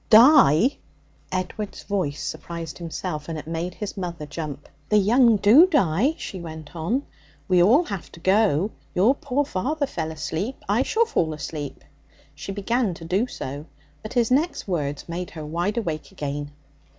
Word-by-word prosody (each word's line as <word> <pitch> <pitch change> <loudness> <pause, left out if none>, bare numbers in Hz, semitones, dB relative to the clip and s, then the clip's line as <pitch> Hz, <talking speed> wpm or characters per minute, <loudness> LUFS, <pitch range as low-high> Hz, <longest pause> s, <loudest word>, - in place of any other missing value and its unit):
'Die!' 245 - +7 0.5
Edward's 185 +3 -4
voice 180 -8 -2
surprised 170 -2 -6
himself, 155 -2 -5
and 165 - -3
it 150 - -7
made 165 +3 -4
his 210 -2 -5
mother 175 -5 -5
jump. 150 -1 -6 0.2
'The 210 - +4
young 230 +3 +5
do 235 - +7
die,' 255 - +2
she 185 - -6
went 160 -1 -9
on; 185 - -1 0.4
'we 180 -2 +4
all 240 - +6
have 200 - -6
to - - -13
go. 195 0 +3 0.2
Your 210 +9 +5
poor 285 0 -1
father 285 +9 -1
fell 160 - -4
asleep. 160 - -3
I 205 +5 +2
shall 450 - +2
fall 160 - 0
asleep.' 150 -2 -6 0.5
She - - -7
began 205 0 0
to 165 - -10
do 195 +8 +1
so. 145 - -6 0.3
But 215 - -7
his 240 -1 +2
next 305 +2 +1
words 145 -6 -2
made 175 +1 -4
her 155 -2 -8
wide 175 +8 -2
awake 165 -9 -3
again. 145 0 -4
185 Hz, 160 wpm, -24 LUFS, 160-230 Hz, 0.5 s, Die